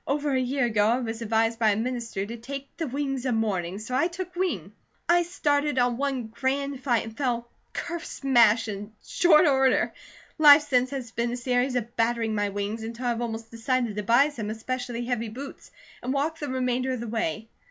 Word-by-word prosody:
"Over 285 0 0
a 260 - +2
year 260 +1 0
ago 210 -3 +2
I 235 +3 +2
was 225 -2 -4
advised 225 +1 +1
by 220 -2 +4
a - - -1
minister 230 -3 -3
to 230 +3 -6
'take 275 +4 -8
the 325 - -3
wings 270 -1 -2
of 245 - +1
morning' 195 -5 -1
so 220 +4 -7
I 275 +6 +3
took 360 +1 -7
wing. 290 - -2 0.4
I 345 +1 +5
started 295 -5 0
on 245 -1 +3
one 270 -3 -1
grand 270 +4 -2
flight 245 -4 +1
and 225 0 -9
fell 235 -3 -2 0.2
ker 340 0 -4
smash 235 -8 +3
in 205 +1 -6
short 345 -3 +5
order. 270 -3 +3 0.5
Life 295 0 +9
since 255 -3 +2
has 260 -4 -5
been 235 +1 -1
a - - -3
series 250 +1 0
of 235 -1 -3
battering 230 -1 +1
my 205 -1 0
wings 205 +3 -3
until 230 +3 -6
I - - +2
have 235 0 -1
almost 225 -1 -5
decided 230 -1 -1
to 210 - -2
buy 240 +8 +4
some 225 -8 -5
especially 240 +2 -4
heavy 235 -2 -2
boots, 270 +6 -9 0.3
and 250 - -3
walk 300 +4 -1
the 295 - -4
remainder 255 0 0
of 255 - -3
the 235 - -5
way. 220 -1 -2
245 Hz, 205 wpm, -26 LUFS, 225-275 Hz, 0.5 s, Life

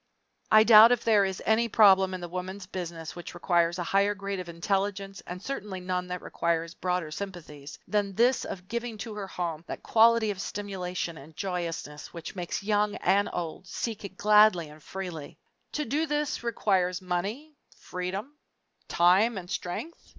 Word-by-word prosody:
I 215 0 +8
doubt 225 +1 +9
if 245 -1 +2
there 210 -3 +4
is 190 -1 -4
any 225 +2 +3
problem 190 -3 +5
in 185 - -7
the 175 - -5
Woman's 185 +2 -6
Business 170 -3 -6
which 175 0 -8
requires 175 -1 +2
a 175 - -2
higher 200 +3 +2
grade 200 -1 -4
of 180 -1 -6
intelligence, 195 +3 -2
and 180 +1 -6
certainly 200 -4 -5
none 180 0 -2
that 180 0 -5
requires 165 0 -1
broader 180 -4 -2
sympathies, 155 -6 -8
than 205 -2 0
this 245 +4 +3
of 180 0 -7
giving 235 0 -4
to 220 +1 -6
her 205 -2 -5
home 170 -4 -4
that - - -6
quality 230 -1 +4
of 190 -2 -5
stimulation 180 -5 -4
and 155 +3 -14
joyousness 170 -6 -4
which 170 +2 -7
makes 180 +1 -4
young 210 0 +1
and 200 +1 +2
old 175 +1 -5
seek 220 +2 -4
it 190 -1 -8
gladly 210 -6 +5
and 150 +1 -14
freely. 175 -4 -7 0.4
To 300 - -1
do 300 +7 0
this 295 0 -1
requires 190 -6 +1
money, 200 - -3 0.2
freedom, 195 +11 -5 0.5
time, 190 +6 +4
and 180 -1 -7
strength? 245 - -5
190 Hz, 170 wpm, -28 LUFS, 175-210 Hz, 0.5 s, doubt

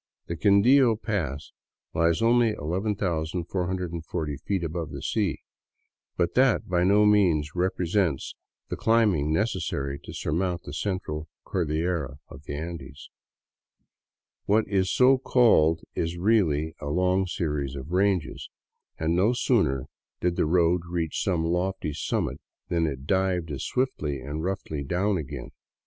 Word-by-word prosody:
The 85 - -4
Quindio 115 - +5
pass 85 - -3 0.4
lies 85 +5 +2
only 115 -1 +4
11,440 90 -3 -2
feet 95 +3 -2
above 80 -1 -3
the - - -7
sea, 105 -6 -1 0.7
but 85 -1 +1
that 130 -2 +3
by 90 -1 +1
no 100 +3 +5
means 90 -8 +3
represents 90 -3 0 0.4
the - - -2
climb 115 -2 +3
ing 75 -1 -1
necessary 70 -7 -1
to - - -10
surmount 85 +2 -2
the 70 - -8
Central 80 -4 -3 0.2
Cordillera 80 -4 -1
of 70 +3 -12
the 70 - -5
Andes. 75 -3 -7 1.3
What 110 +2 +2
is 95 -2 +1
so 130 +1 +5
called 85 - +4
is 85 +1 -2
really 85 -6 +2
a 70 - -6
long 90 +4 +1
series 75 -6 -2
of 70 +3 -7
ranges, 95 -3 0 0.5
and 80 +1 0
no 100 +7 +3
sooner 65 - +1 0.3
did 90 -1 0
the - - +1
road 85 +1 +3
reach 85 -3 -2
some 85 -4 0
lofty 90 -2 -1
summit 75 - -2 0.3
than 85 -2 +1
it 70 -2 -5
dived 90 -2 0
as 70 -2 -4
swiftly 80 - -1
and 75 +4 -5
roughly 90 -6 -3
down 95 +7 0
again. 70 -3 -7
85 Hz, 135 wpm, -26 LUFS, 75-100 Hz, 1.3 s, Quindio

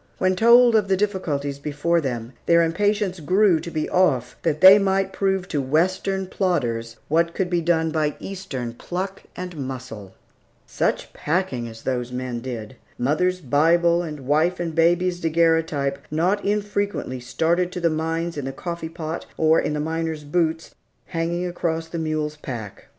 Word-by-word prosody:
When 185 0 +2
told 235 +3 +6
of 210 -2 +3
the 190 -1 +2
difficulties 150 -9 -2
before 150 +4 0
them, 120 -3 -4
their 170 0 +5
impatience 200 +2 0
grew 185 +2 +3
to 170 +2 -6
be 155 -2 -2
off, 135 -10 +1
that 155 -2 0
they 190 +2 +9
might 195 -1 +1
prove 190 -2 0
to 145 - 0
Western 185 +7 0
plodders 120 -13 -1
what 170 +2 +1
could 185 -2 -1
be 175 -1 +2
done 160 -1 +1
by 155 -2 0
Eastern 145 -12 -5
pluck 185 +9 -5
and 180 -1 -6
muscle. 130 -8 -7 0.5
Such - - -2
packing 150 -7 -1
as 115 0 -11
those 125 -2 -2
men 125 -1 -4
did! 120 -1 -6 0.2
Mother's 180 +8 +1
Bible, 170 +5 +3
and 155 -4 -6
wife 155 +7 +1
and 170 -2 -3
baby's 175 +2 +2
daguerreotype 160 -4 +1
not 180 +7 +1
infrequently 205 -9 -1
started 165 +8 0
to 180 - -4
the 170 - +2
mines 165 +1 -2
in 145 - -3
the 135 - -3
coffee 170 +3 -5
pot, 165 -1 -5
or 160 0 +4
in 150 - -1
the 150 - -2
miner's 160 0 -2
boots, 160 +1 -1 0.4
hanging 170 +2 -1
across 165 -2 -2
the 165 0 -5
mule's 155 -1 -2
pack. 115 -8 -7
165 Hz, 160 wpm, -23 LUFS, 145-180 Hz, 0.5 s, they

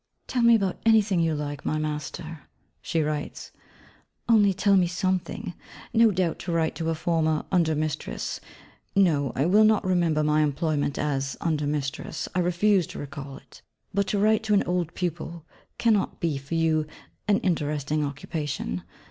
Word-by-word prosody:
'Tell 250 - -1
me 235 0 +7
about 195 -4 0
anything 215 -5 +4
you 165 -2 +1
like, 145 -1 -4
my 155 - -1
Master,' 155 +1 -5 0.3
she 165 -2 0
writes, 150 -1 -4 0.8
'only 210 -4 +5
tell 200 +1 +3
me 180 -2 +4
something! 180 -1 -2 0.4
No 230 0 +6
doubt, 180 -4 0
to 175 - -4
write 165 -1 +1
to 165 -1 -3
a 165 - 0
former 160 -1 0
under 165 -4 +2
mistress 150 - -3 0.6
(no, 155 -9 +3
I 135 - +1
will 205 +5 +5
not 215 -2 +3
remember 170 -4 +2
my 150 0 +3
employment 150 -1 0
as 140 -2 -1
under 155 -3 0
mistress, 145 0 -3
I 185 - 0
refuse 180 +1 +2
to - - -9
recall 140 -1 -7
it), - - -17 0.3
but 200 0 +1
to 205 - 0
write 215 +2 +3
to 210 -1 +3
an 200 - +3
old 175 -2 -2
pupil, 170 -2 -4 0.3
cannot 220 -4 +1
be, 165 -4 0
for 140 +4 -5
you, 160 -2 +2 0.4
an 205 -1 +4
interesting 150 -3 0
occupation. 140 - -4
165 Hz, 165 wpm, -26 LUFS, 150-190 Hz, 0.8 s, me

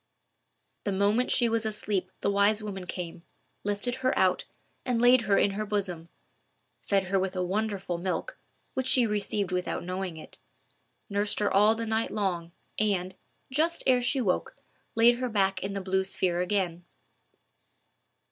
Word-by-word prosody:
The 200 - -1
moment 205 +6 +2
she 240 - +3
was 225 -1 0
asleep, 210 -3 -2
the 200 - +1
wise 205 +2 +3
woman 195 -3 -6
came, 170 -2 -5 0.4
lifted 205 +4 -2
her 255 0 +1
out, - - +2 0.4
and 250 -3 0
laid 245 +1 +6
her 195 - +5
in 200 - +3
her 210 +2 -3
bosom; 190 -5 -3 0.7
fed 195 -1 +1
her 195 0 +2
with 190 0 -2
a 185 - 0
wonderful 195 -2 -2
milk, 190 - -3 0.4
which 260 -1 -1
she 255 -2 +5
received 205 -2 -1
without 180 0 -2
knowing 185 -1 -4
it; 155 - -12 0.7
nursed 205 0 0
her 205 -1 +1
all 210 +3 +5
the 230 0 -3
night 225 0 0
long, 180 -5 -2 0.3
and, 190 -3 0 0.4
just 320 +5 +1
ere 255 -2 +4
she 260 +2 +1
woke, 190 -6 -1 0.4
laid 240 +1 +5
her 255 -1 -1
back 195 -3 +1
in 195 +1 -3
the 200 - -2
blue 190 0 +1
sphere 180 -2 0
again. 180 -2 -1
200 Hz, 160 wpm, -28 LUFS, 185-225 Hz, 0.7 s, laid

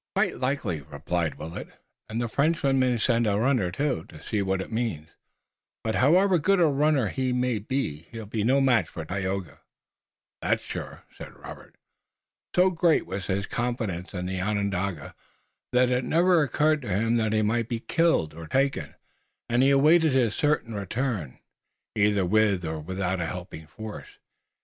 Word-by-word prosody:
"Quite - - +1
likely," 125 - -1
replied 80 +3 -3
Willet, 80 +3 -7 0.4
"and 110 +2 -3
the 120 - -1
Frenchman 140 +1 +1
may 125 -2 +2
send 115 0 +2
a 100 -1 +2
runner, 120 -5 +2
too, 130 - -2
to 80 - -13
see 105 -3 -1
what 95 -1 0
it 95 - -6
means, 110 -10 -2 0.7
but 110 - -1
however 180 - +4
good 195 +5 +3
a 170 - +5
runner 145 -5 +2
he 130 +2 -1
may 125 -2 0
be 100 - -3
he'll 115 -1 -7
be 105 +1 -2
no 130 +5 +3
match 130 -4 +3
for 80 - -7
Tayoga." 95 -3 -3 0.8
"That's - - 0
sure," - - -7
said - - -10
Robert. - - -12 0.8
So 185 +1 +5
great 170 -2 +2
was 95 0 -5
his 100 +1 -1
confidence 110 -8 -3
in 90 -1 -4
the 95 0 -3
Onondaga 100 -5 -2 0.6
that 125 0 +3
it 125 +1 +1
never 170 +4 +3
occurred 150 +2 +2
to 120 - -7
him 115 +5 +1
that 110 -2 +1
he 110 0 +2
might 115 +2 0
be 120 -2 -2
killed 165 - +1
or 80 0 -9
taken, 135 +4 0 0.5
and 120 +1 +2
he 135 - +5
awaited 155 +2 +5
his 120 -5 +2
certain 145 -6 0
return, 100 - -3 0.6
either 100 -2 +2
with 100 -2 +2
or 80 0 -3
without 95 +3 -2
a 80 - -1
helping 85 -3 -7
force. 110 +5 -9
110 Hz, 170 wpm, -26 LUFS, 95-135 Hz, 0.8 s, a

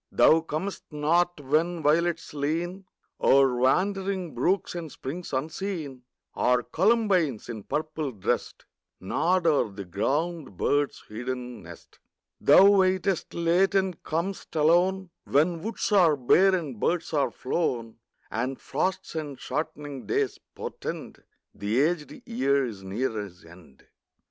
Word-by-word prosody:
Thou 160 +1 +5
comest 165 +5 -4
not 170 +3 +1
when 155 +4 0
violets 165 +3 +1
lean 170 +6 -2 0.4
O'er 135 -2 +5
wandering 185 +6 0
brooks 175 +11 0
and 170 -4 -6
springs 165 +9 -6
unseen, 155 -1 -4 0.3
Or 125 0 +2
columbines, 185 - +1
in 110 -3 -5
purple 155 +3 -3
dressed, 105 -6 -3 0.3
Nod 175 - +1
o'er 150 -8 +3
the 100 0 -8
ground 140 - -2
bird's 145 +6 0
hidden 125 +1 -5
nest. 85 -1 -14 0.4
Thou 190 - +7
waitest 190 -2 +2
late 175 +4 +2
and 190 -2 0
com'st 170 +4 -4
alone, 175 +4 +3
When 165 +3 +2
woods 220 +1 -3
are 175 -7 +5
bare 185 +9 +4
and 145 - -4
birds 170 +4 -1
are 145 -2 +2
flown, 120 -6 -2 0.3
And 130 +4 -2
frosts 185 +7 -2
and 150 -4 -5
shortening 145 -3 -5
days - - 0 0.2
portend - - -6 0.3
The 105 +4 -1
aged 170 - -1
year 140 - +1
is 105 -5 -7
near 110 +8 -2
his 90 -4 -11
end. 80 -5 -17
155 Hz, 125 wpm, -27 LUFS, 130-180 Hz, 0.4 s, Thou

